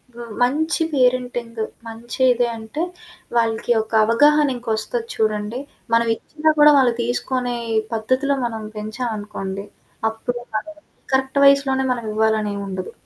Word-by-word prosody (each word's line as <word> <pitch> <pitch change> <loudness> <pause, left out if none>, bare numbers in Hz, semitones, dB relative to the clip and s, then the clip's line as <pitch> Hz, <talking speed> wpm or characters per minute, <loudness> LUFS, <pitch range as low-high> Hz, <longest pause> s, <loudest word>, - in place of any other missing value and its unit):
వ్ - - -11
వ - - -5 0.2
మంచి 315 +6 +2
పేరెంటింగ్ 245 -3 0 0.3
మంచిదే 240 +2 +1
అంటే, 225 +8 -5 0.6
వాళ్ళకి 225 +1 +1
ఒక 220 - -11
అవగాహనింకొస్తది 240 -4 +2
చూడండి, 215 +2 -1 0.3
మనవిచ్చిన 235 +7 +1
గూడా 295 0 +9
వాళ్ళు 250 -3 +4
తీసుకొనే 245 0 -1 0.4
పద్ధతిలో 255 +5 +1
మనం 225 -2 -4
పెంచావనుకోండి, 210 -3 -4 0.4
అప్పుడు 240 +2 -4 0.2
వాళ్ళకి 305 +8 -5 0.3
కరెక్ట్ 265 +1 +1
వయసులోనే 275 -1 +4
మనవివ్వాలనేవుండదు. 215 -4 -1
240 Hz, 100 wpm, -21 LUFS, 220-265 Hz, 0.6 s, గూడా